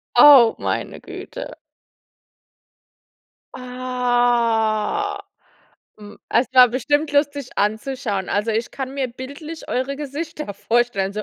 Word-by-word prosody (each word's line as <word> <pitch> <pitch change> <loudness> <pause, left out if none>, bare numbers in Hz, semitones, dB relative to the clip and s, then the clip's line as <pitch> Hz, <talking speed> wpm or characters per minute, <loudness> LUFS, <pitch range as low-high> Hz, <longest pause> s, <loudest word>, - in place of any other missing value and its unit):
Oh, 265 -6 +8
meine - - -3
Güte. - - -8 2.0
Ah. 245 - 0 0.8
Hm, 205 -1 -13
es 235 +3 +2
war 255 -1 +8
bestimmt 290 +5 0
lustig 285 -2 0
anzuschauen. 215 -1 -2
Also, 210 +3 0
ich 225 +1 -2
kann 265 -1 -6
mir 270 -2 -2
bildlich 280 +6 -9
eure 260 +2 -2
Gesichter 300 -4 -6
vorstellen, 215 -2 0
so. 215 +1 -4
250 Hz, 100 wpm, -21 LUFS, 225-280 Hz, 2.0 s, Oh